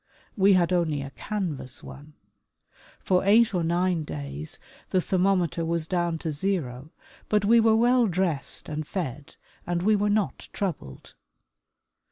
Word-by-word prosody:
We 200 -1 +5
had 180 -1 +3
only 160 -5 0
a 135 - -8
canvas 165 -7 -5
one. 150 +2 -11 0.9
For 185 -1 +1
eight 215 +3 +5
or 175 -2 0
nine 175 0 +1
days 70 - -5 0.3
the 185 - +2
thermometer 180 -2 +1
was 165 -1 -1
down 175 -2 0
to 160 - 0
zero, 145 -5 -3 0.4
but 210 -1 +2
we 230 +3 +6
were 225 -1 +4
well 240 +1 +4
dressed 175 -6 0
and 155 0 -4
fed 145 -6 -5 0.3
and 175 0 -1
we 215 +2 +4
were 205 0 +1
not 205 -2 -1
troubled. 160 - -5
175 Hz, 145 wpm, -26 LUFS, 150-200 Hz, 0.9 s, we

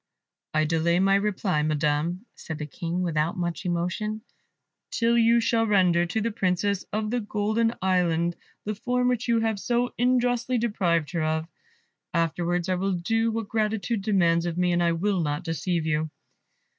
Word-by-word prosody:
"I 155 0 +3
delay 165 +2 +2
my 195 +1 +3
reply, 195 -5 +1
Madam," 155 +5 0
said 160 - -7
the 150 - -4
King, 170 +5 -3
without 160 -1 0
much 175 +1 -3
emotion, 180 +5 -2 0.7
"till 235 0 +1
you 235 0 +5
shall 225 0 +1
render 180 -4 +3
to 200 +6 -1
the 230 +2 -1
Princess 195 -1 0
of 215 0 -2
the 245 - +1
Golden 220 +2 0
Island 175 -2 +1 0.3
the 215 - -1
form 250 +4 0
which 245 -1 -1
you 230 -1 +2
have 220 -2 0
so 245 +3 0
unjustly 245 0 +2
deprived 180 -9 0
her 170 -3 -1
of; 160 +1 -1 0.7
afterwards 170 +1 0
I 185 - +1
will 190 +2 0
do 225 +6 0
what 225 -1 -3
gratitude 220 0 -1
demands 175 -5 +2
of 170 0 -3
me, 180 0 +2
and 175 0 +2
I 170 -1 +2
will 190 +2 0
not 145 -2 -2
deceive 165 0 -1
you." 155 0 0
185 Hz, 170 wpm, -26 LUFS, 170-220 Hz, 0.7 s, you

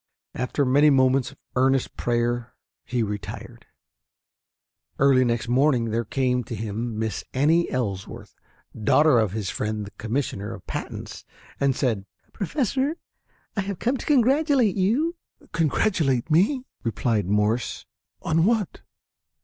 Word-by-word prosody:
After 125 +3 -1
many 145 +4 +5
moments 130 -1 +3
of 140 - -18 0.2
earnest 130 0 +2
prayer 120 0 -1 0.3
he 120 -2 -1
retired. 105 -1 -7 1.3
Early 135 -2 +5
next 120 -1 -1
morning 125 -2 +2
there 115 +1 -1
came 125 +1 0
to 115 - -5
him 110 +1 -4
Miss 110 -1 -2
Annie 160 +6 +3
Ellsworth, 100 -7 -4 0.4
daughter 125 +5 +4
of 105 -4 0
his 105 -4 -2
friend 105 -1 -3
the 100 - -10
Commissioner 110 -3 -3
of - - -14
Patents, - - -6 0.4
and 140 -2 +2
said, 110 -8 -1 0.3
"Professor, 270 - -1 0.6
I 205 - +1
have 195 -1 -4
come 250 +8 0
to - - -8
congratulate 270 - +3
you." 260 - +1 0.3
"Congratulate 155 - +1
me!" 230 - +3 0.2
replied 110 -2 0
Morse. 105 +4 0 0.4
"On 165 0 +2
what?" 215 -1 0
130 Hz, 125 wpm, -24 LUFS, 115-170 Hz, 1.3 s, many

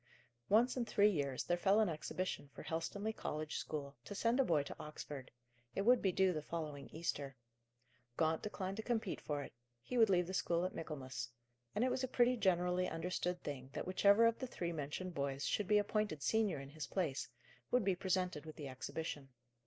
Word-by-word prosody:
Once 235 +5 +5
in 250 - +1
three 210 -2 +4
years 140 -7 -1
there 175 - +1
fell 195 +3 +5
an 220 - +4
exhibition 160 -1 -3
for - - -7
Helstonleigh 200 +7 -2
College 155 0 -3
school, 140 -2 -4
to 205 - -7
send 230 +5 +2
a - - +7
boy 155 - +3
to - - -7
Oxford. 145 -3 -7 0.5
It 195 - +1
would 245 +3 +6
be 190 - +3
due 190 0 +3
the 155 - -2
following 150 -3 -5
Easter. 145 -4 -3 0.8
Gaunt 160 0 +2
declined 195 -2 -3
to - - -1
compete 225 -4 -1
for 145 -1 -2
it; - - -10 0.3
he 240 - -2
would 225 -2 +7
leave 180 -2 +4
the 185 - -5
school 170 -2 +1
at 185 - -2
Michaelmas; 135 -6 -5 0.5
and 220 - +2
it 255 - +3
was 260 +1 -1
a - - +1
pretty 250 0 +4
generally 180 -3 +2
understood 180 +1 -2
thing 135 -3 -5
that - - -3
whichever 200 +4 +5
of 230 0 +3
the 260 - -3
three 175 -7 -3
mentioned 160 +4 -4
boys 140 -2 -1
should 210 - 0
be 210 - +5
appointed 205 -7 0
senior 215 -8 +2
in 135 0 -8
his 150 -1 -6
place, 165 -8 -1 0.4
would 250 -2 +3
be 195 - +4
presented 180 -4 0
with 155 -1 -9
the 145 - -6
exhibition. 135 +1 -5
180 Hz, 200 wpm, -37 LUFS, 150-210 Hz, 0.8 s, a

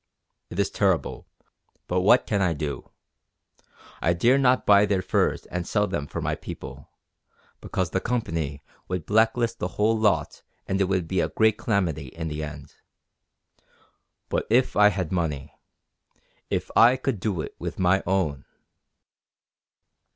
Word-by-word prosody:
It 85 - -8
is 100 -1 +1
terrible, 95 -5 0 0.6
but 90 +1 0
what 95 - +5
can 100 -2 0
I 90 -3 +2
do? 75 -2 -5 1.1
I 85 - +2
dare 120 +10 +3
not 130 -1 +3
buy 105 0 +6
their 95 -2 0
furs - - 0
and 90 -1 -5
sell 105 -1 +1
them 75 -8 -3
for - - -5
my - - -1
people, - - -8 0.7
because - - -2
the - - +1
Company 80 - -2 0.2
would 90 -4 -3
blacklist 115 +2 +2
the 90 - -1
whole 110 +2 +3
lot 100 -10 0 0.2
and 95 +1 -1
it - - +4
would 95 -3 -1
be 95 - -1
a - - +1
great 110 -1 +2
calamity 85 - -1
in 80 +5 -6
the 75 0 -4
end. 75 -2 -8 1.5
But - - -2
if 125 +3 +3
I 105 0 +7
had 95 -5 -1
money 75 -6 -2 1.0
if - - -2
I 120 +3 +7
could 130 -5 -2
do 95 -3 -2
it - - -7
with - - -5
my 95 +1 +3
own...." 85 -8 0
95 Hz, 150 wpm, -25 LUFS, 80-105 Hz, 1.5 s, I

